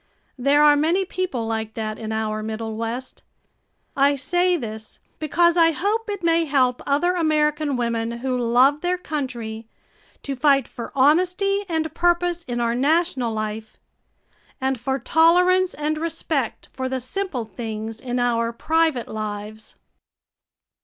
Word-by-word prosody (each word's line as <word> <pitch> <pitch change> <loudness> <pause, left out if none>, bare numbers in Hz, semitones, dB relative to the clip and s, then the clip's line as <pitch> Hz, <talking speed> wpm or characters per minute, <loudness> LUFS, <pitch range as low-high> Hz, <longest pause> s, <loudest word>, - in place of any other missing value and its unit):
There 280 +3 +4
are 295 0 +7
many 335 +6 +1
people 360 -11 -3
like 220 -1 -3
that 215 -1 -4
in 220 -1 -5
our 215 -1 -2
Middle 220 0 -4
West. 230 +3 -5 0.7
I 280 +1 +4
say 355 +6 +1
this, 220 -5 -7 0.2
because 340 +3 +2
I 330 -1 +5
hope 425 +6 -1
it 405 -3 -4
may 335 0 +3
help 260 -4 +1
other 320 +6 +2
American 300 -4 +1
women 230 -1 -1
who 255 +2 -2
love 250 +4 +3
their 360 +1 0
country 240 -9 -5 0.6
to 275 - -3
fight 275 -1 +3
for 235 - -8
honesty 365 +8 +2
and 320 -2 -1
purpose 350 0 +1
in 240 -1 -3
our 235 -1 +1
national 280 -1 +1
life, 215 0 -5 0.8
and 265 -2 -1
for 265 +3 -1
tolerance 355 +6 +3
and 305 +1 -2
respect 315 -5 -3
for 260 0 -3
the 260 0 -2
simple 255 - -4
things 220 +1 -6
in 250 -1 -3
our 230 -1 +1
private 315 0 0
lives. 215 0 -6
270 Hz, 140 wpm, -22 LUFS, 230-330 Hz, 0.8 s, are